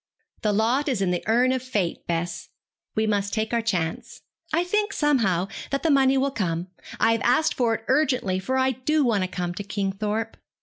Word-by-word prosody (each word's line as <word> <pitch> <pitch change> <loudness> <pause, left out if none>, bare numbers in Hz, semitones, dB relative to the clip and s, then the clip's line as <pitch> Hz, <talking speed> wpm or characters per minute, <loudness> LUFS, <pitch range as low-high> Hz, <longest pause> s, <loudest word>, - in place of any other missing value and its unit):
'The 210 - +1
lot 235 +8 +1
is 250 -6 0
in 190 -2 +1
the 175 - -1
urn 245 +3 +3
of 260 -1 0
fate, 210 -9 -2
Bess, 170 0 -3 0.5
We 220 - +2
must 205 -1 0
take 220 +1 -1
our 235 - +2
chance. 175 -8 -3 0.3
I 330 +2 +2
think, 415 +3 0
somehow, 220 - +2 0.2
that 275 - -2
the 325 - +3
money 270 -1 +4
will 275 +1 +1
come. 175 -6 -2 0.3
I 225 - +4
have 230 - +1
asked 255 +6 +3
for 235 -3 +1
it 225 - -9
urgently, 255 -9 +1
for 260 +8 -1
I 260 0 +3
do 280 +4 +1
want 210 -5 +2
to - - -1
come 180 -1 -3
to 205 - -5
Kingthorpe.' 205 +3 -2
225 Hz, 205 wpm, -25 LUFS, 195-265 Hz, 0.5 s, money